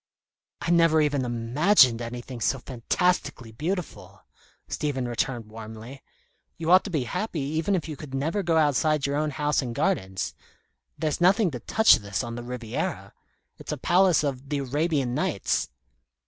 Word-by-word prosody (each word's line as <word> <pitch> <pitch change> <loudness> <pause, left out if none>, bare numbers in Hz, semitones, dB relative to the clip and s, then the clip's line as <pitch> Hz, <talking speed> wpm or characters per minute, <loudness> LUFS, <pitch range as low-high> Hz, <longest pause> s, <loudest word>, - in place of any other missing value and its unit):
"I 165 - -1
never 165 -2 +5
even 145 -3 +1
imagined 120 - +3
anything 120 +1 -7
so 135 - +1
fantastically 130 0 -1
beautiful," 165 - -5 0.4
Stephen 135 -4 -2
returned 120 0 -2
warmly. 110 +4 -9 0.6
"You 165 +1 -1
ought 185 +1 +7
to - - -4
be 155 -8 -1
happy, 180 - -3
even 160 +7 0
if 170 - -2
you 155 - -5
could 135 -1 -8
never 160 +9 -1
go 170 -3 +1
outside 150 0 +2
your 140 0 -1
own 155 0 0
house 150 0 0
and 120 -3 -5
gardens. 95 -3 -1 0.6
There's 155 +1 -2
nothing 190 +1 +4
to 125 - -5
touch 220 - +5
this 100 -4 -3
on 120 - -5
the 120 - -5
Riviera. 120 -2 -4 0.5
It's - - -7
a - - -2
palace 180 -2 +3
of 135 -1 -3
the 145 - -1
'Arabian 140 -1 -1
Nights.'" - - -1
145 Hz, 160 wpm, -26 LUFS, 120-165 Hz, 0.6 s, ought